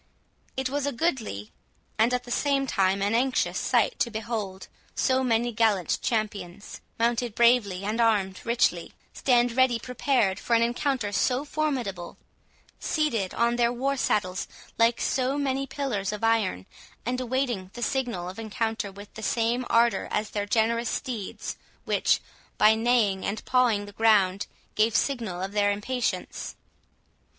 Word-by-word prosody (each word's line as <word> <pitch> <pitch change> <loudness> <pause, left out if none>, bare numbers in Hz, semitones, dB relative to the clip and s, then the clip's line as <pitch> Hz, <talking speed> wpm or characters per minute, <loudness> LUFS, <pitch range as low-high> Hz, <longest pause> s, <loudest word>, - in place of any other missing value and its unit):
It 265 0 0
was 285 +1 -2
a - - 0
goodly, 235 - -2 0.5
and 225 +3 +4
at 250 0 0
the 245 - -10
same 275 +1 +1
time 195 -4 +1
an 205 +2 +1
anxious, 255 +3 +1
sight, - - +1
to 235 - +1
behold 215 -4 -4 0.3
so 260 0 +2
many 240 -1 +1
gallant 215 -6 +1
champions, 210 -4 -3 0.2
mounted 235 -1 0
bravely, 235 -6 +3
and 215 +4 -1
armed 200 -5 +1
richly, 235 +1 +1 0.2
stand 245 -2 +3
ready 255 0 +3
prepared 245 -5 0
for 235 - +1
an 230 - +4
encounter 240 -2 0
so 255 +6 +1
formidable, 255 - -3 0.6
seated 235 - -1
on 235 0 +2
their 235 -1 +3
war 270 +3 -1
saddles 185 -8 0 0.3
like 230 +1 +4
so 260 +2 0
many 275 -1 -1
pillars 250 -8 -2
of 210 +1 -6
iron, 220 - +1 0.4
and 250 +2 -1
awaiting 245 -6 -1
the 240 - -4
signal 240 -11 -1
of 185 +4 -7
encounter 220 -1 -2
with 200 +1 -12
the 220 - -9
same 235 +3 0
ardour 235 0 +3
as 210 0 -2
their 205 -1 -2
generous 230 +2 +1
steeds, 235 -8 -4 0.3
which, - - +2 0.4
by 215 +1 +6
neighing 220 -4 +2
and 210 +2 -3
pawing 240 -5 +2
the 205 - -10
ground, 200 -3 +3 0.3
gave 220 +1 +2
signal 230 -10 0
of 195 - -3
their 205 0 +2
impatience. 240 +5 -3
230 Hz, 150 wpm, -26 LUFS, 205-250 Hz, 0.6 s, by